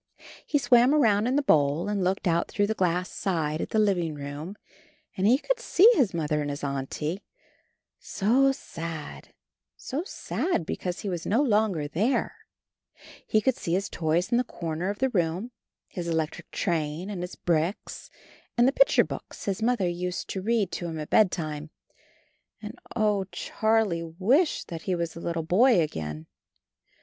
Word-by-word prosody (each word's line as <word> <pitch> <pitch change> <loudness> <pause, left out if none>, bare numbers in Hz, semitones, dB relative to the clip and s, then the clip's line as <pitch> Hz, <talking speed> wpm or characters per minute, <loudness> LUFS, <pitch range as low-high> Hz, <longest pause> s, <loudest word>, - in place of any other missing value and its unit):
He 295 - +2
swam 245 +1 +5
around 220 -6 +3
in 255 - +1
the 290 - +2
bowl, 150 - +3
and 205 -2 -1
looked 185 +1 0
out 170 0 +1
through 205 - 0
the 215 - -1
glass 180 -2 0
side 160 -5 -1
at - - -4
the - - -1
living 180 -7 +1
room, 145 +6 -6 0.6
and 190 0 +1
he 245 +4 +6
could - - -1
see 420 -4 +5
his 260 - +2
Mother 150 -3 -1
and 145 - -3
his 145 0 -5
Auntie, 145 +6 -3 0.8
so 255 +7 +2
sad, 165 - -7 0.4
so 285 +6 -4
sad, 360 - -2
because 180 +2 -4
he - - -5
was 175 -3 -4
no 225 - +2
longer 210 - +1
there; 210 - 0 0.9
he 215 - +3
could 260 +3 +2
see 170 - -3
his 195 +2 0
toys 165 +2 0
in 240 - +4
the - - +2
comer 170 -4 -4
of 205 - -3
the 265 +3 +1
room, 180 +3 -1 0.4
his 175 -3 -6
electric 160 -2 -2
train, 165 +3 -2
and 185 -4 -5
his 180 - -6
bricks, 170 +3 -2 0.5
and 240 +1 +5
the - - +4
picture - - +5
books - - -8
his 195 +1 -2
mother 230 -5 +1
used 180 +1 -3
to 190 - -3
read 215 -2 +1
to 175 - -4
him 160 -1 -5
at 150 - -7
bedtime. 155 -7 +1 0.9
And, - - -8 0.2
oh! 210 -3 +1
Charlie 195 -5 -1
wished 270 - +2
that 165 -2 -6
he 185 +2 -1
was 170 -1 -3
a - - -7
little 165 -1 -2
boy 205 +6 +4
again. 80 - -3
180 Hz, 170 wpm, -27 LUFS, 160-220 Hz, 0.9 s, he